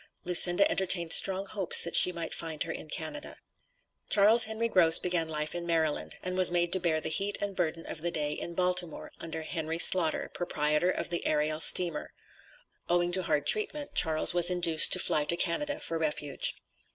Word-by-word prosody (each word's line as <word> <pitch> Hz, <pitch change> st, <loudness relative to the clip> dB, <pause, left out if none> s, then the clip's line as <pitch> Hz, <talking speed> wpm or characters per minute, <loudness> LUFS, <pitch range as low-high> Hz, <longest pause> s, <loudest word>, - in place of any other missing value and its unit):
Lucinda 180 Hz, +1 st, +4 dB
entertained 175 Hz, -3 st, +1 dB
strong 195 Hz, 0 st, +4 dB
hopes 195 Hz, -3 st, +1 dB
that 170 Hz, -, -2 dB
she 180 Hz, -, +7 dB
might 170 Hz, -2 st, -8 dB
find 160 Hz, -2 st, -6 dB
her 165 Hz, -, -8 dB
in 155 Hz, -, -11 dB
Canada. 235 Hz, -, -8 dB, 0.7 s
Charles 215 Hz, +3 st, +5 dB
Henry 220 Hz, +1 st, -5 dB
Gross 170 Hz, -7 st, +4 dB
began 175 Hz, -3 st, -3 dB
life 150 Hz, -1 st, -6 dB
in 175 Hz, 0 st, -8 dB
Maryland, 160 Hz, -3 st, -4 dB
and 185 Hz, 0 st, -6 dB
was 185 Hz, -1 st, +5 dB
made 175 Hz, -1 st, -3 dB
to 185 Hz, -, +2 dB
bear 165 Hz, -3 st, -3 dB
the 155 Hz, -, -4 dB
heat 200 Hz, +5 st, -2 dB
and 200 Hz, -1 st, -6 dB
burden 165 Hz, -2 st, -5 dB
of 155 Hz, -, -9 dB
the 175 Hz, -, -3 dB
day 150 Hz, -3 st, -4 dB
in 170 Hz, +3 st, -8 dB
Baltimore, 180 Hz, -2 st, -2 dB
under 160 Hz, -1 st, -9 dB
Henry 160 Hz, 0 st, -7 dB
Slaughter, 170 Hz, -2 st, +4 dB
proprietor 150 Hz, 0 st, -3 dB
of 180 Hz, -, -6 dB
the 170 Hz, -, -4 dB
Ariel 155 Hz, 0 st, -3 dB
Steamer. 170 Hz, 0 st, +3 dB, 0.8 s
Owing 175 Hz, 0 st, -2 dB
to 185 Hz, +1 st, +1 dB
hard 150 Hz, -4 st, -4 dB
treatment, 285 Hz, -, 0 dB
Charles 160 Hz, -1 st, +3 dB
was 175 Hz, 0 st, +3 dB
induced 170 Hz, -3 st, +3 dB
to -, -, +6 dB
fly 150 Hz, -, -2 dB
to 170 Hz, -, 0 dB
Canada 290 Hz, -, -3 dB
for 165 Hz, -1 st, -7 dB
refuge. 150 Hz, -3 st, -3 dB
170 Hz, 190 wpm, -26 LUFS, 160-185 Hz, 0.8 s, she